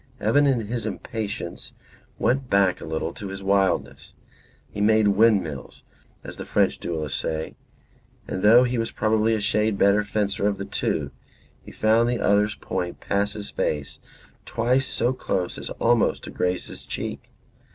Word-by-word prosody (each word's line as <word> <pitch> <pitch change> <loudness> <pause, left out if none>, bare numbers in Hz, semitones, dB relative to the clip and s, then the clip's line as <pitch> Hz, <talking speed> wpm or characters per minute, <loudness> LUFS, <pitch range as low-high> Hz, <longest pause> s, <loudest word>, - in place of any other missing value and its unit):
Evan, 140 +7 +3
in 130 -4 +2
his 115 +2 -3
impatience, 110 -6 -5 0.4
went 130 0 0
back 95 -2 +3
a - - -6
little 80 +1 -3
to 100 - -7
his 95 0 -7
wildness. 95 -1 0 0.5
He 100 - -6
made 110 0 +4
windmills, 100 -8 +1 0.4
as - - -9
the - - -6
French - - +1
duellists 80 -4 -3
say, 80 0 -3 0.7
and 95 - -3
though 115 +5 +7
he 125 -1 0
was 115 - -1
probably 110 0 +1
a - - -1
shade 105 +1 +1
the 100 - +3
better 100 +1 +4
fencer 100 -1 -1
of 100 - 0
the 100 - -5
two, - - -2 0.5
he - - -11
found 115 +2 +3
the 120 - -1
other's 105 +1 +2
point 90 -2 -4
pass 100 +1 0
his 105 -1 -7
face 75 -2 -2 0.4
twice 125 +4 +1
so 120 +2 0
close 90 -8 -2
as - - -6
almost 120 -1 +2
to - - -7
graze 90 0 -1
his - - -10
cheek. - - -6
105 Hz, 165 wpm, -24 LUFS, 95-115 Hz, 0.7 s, though